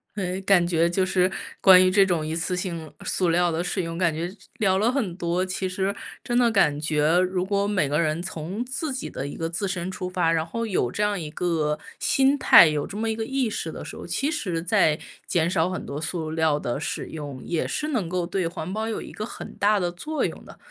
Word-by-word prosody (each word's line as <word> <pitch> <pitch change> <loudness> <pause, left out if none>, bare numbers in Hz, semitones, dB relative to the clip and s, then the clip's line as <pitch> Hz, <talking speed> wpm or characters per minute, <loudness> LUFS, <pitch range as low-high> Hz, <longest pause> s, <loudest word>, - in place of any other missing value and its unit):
诶， 185 -2 -2
感 190 -3 +4
觉 170 -1 +2
就 185 +2 +1
是 185 -1 +2 0.3
关 185 -1 +8
于 185 - +3
这 195 0 +5
种 170 -4 0
一 155 - -3
次 170 +2 -1
性 170 -5 -4
塑 180 -2 +1
料 175 +1 +3
的 165 +1 -1
使 180 +1 -2
用， 165 0 -5
感 170 -3 +2
觉 165 +3 -3
这 195 - -13 0.2
聊 190 -3 +3
了 215 +4 +2
很 225 -11 -1
多， 175 +1 0
其 185 0 -2
实 190 +2 -1 0.3
真 240 0 0
的 240 -1 +5
感 150 -9 +3
觉 155 +2 +2
如 185 0 0
果 200 0 0
每 185 -9 +1
个 150 +2 +1
人 155 +1 0
从 180 +5 -4
自 270 +3 -3
己 260 - -4
的 135 - -5
一 - - -7
个 165 0 -3
自 185 +4 -2
身 185 -1 -3
出 180 -1 -5
发， 175 -3 +1
然 160 -1 +1
后 230 +7 -3
有 185 - 0
这 210 - -1
样 205 -2 0
一 155 -2 -5
个 155 -3 0 0.2
心 270 +1 +3
态， 170 - +8
有 150 -1 -1
这 200 - -9
么 225 +1 -1
一 220 - -1
个 220 0 -3
意 265 -2 0
识 - - -4
的 - - -7
时 - - -8
候， - - -8
其 285 +3 0
实 185 - -2
在 175 -4 +3 0.3
减 170 -1 +1
少 170 0 +1
很 185 - -4
多 140 +1 -5
塑 160 -1 -3
料 160 -2 +2
的 120 +2 -3
使 - - -4
用， 145 -4 -7
也 170 -2 -1
是 300 - -2
能 225 - -1
够 180 0 -1
对 180 -1 -1
环 165 +1 -5
保 220 +1 -2
有 225 - -3
一 - - -9
个 215 - -5
很 - - -9
大 205 0 +3
的 175 -1 -1
作 300 - -2
用 - - -6
的。 - - -13
180 Hz, 265 characters per minute, -25 LUFS, 165-200 Hz, 0.3 s, 关